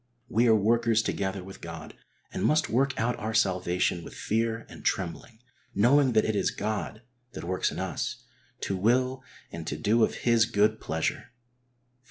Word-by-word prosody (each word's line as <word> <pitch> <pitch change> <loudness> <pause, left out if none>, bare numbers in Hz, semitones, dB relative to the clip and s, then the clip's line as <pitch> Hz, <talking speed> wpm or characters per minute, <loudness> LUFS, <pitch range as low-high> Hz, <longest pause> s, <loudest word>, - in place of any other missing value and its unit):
We 115 +2 +3
arc 110 -1 +5
workers 115 +1 +3
together 95 -2 -2
with 95 +1 -11
God 85 -2 -8 0.4
and - - -3
must 155 +1 +2
work 135 +4 +1
out 120 +2 +1
our 110 0 -3
salvation 90 -3 +1
with - - -10
fear 115 +1 -1
and - - -12
trembling, 95 +5 -2 0.4
knowing 130 +5 +4
that 110 - +4
it 110 - 0
is - - +2
God 110 +1 -4 0.3
that - - -7
works 90 +2 0
in - - -7
us, - - -3 0.4
to 100 - -1
will 125 +6 +1 0.3
and 80 -1 -7
to 75 - -3
do 110 +8 +3
of - - +1
His 115 -2 +5
good 110 -1 +2
pleasure 80 +8 -2
\Phil. 120 0 -44
110 Hz, 175 wpm, -28 LUFS, 95-120 Hz, 0.4 s, arc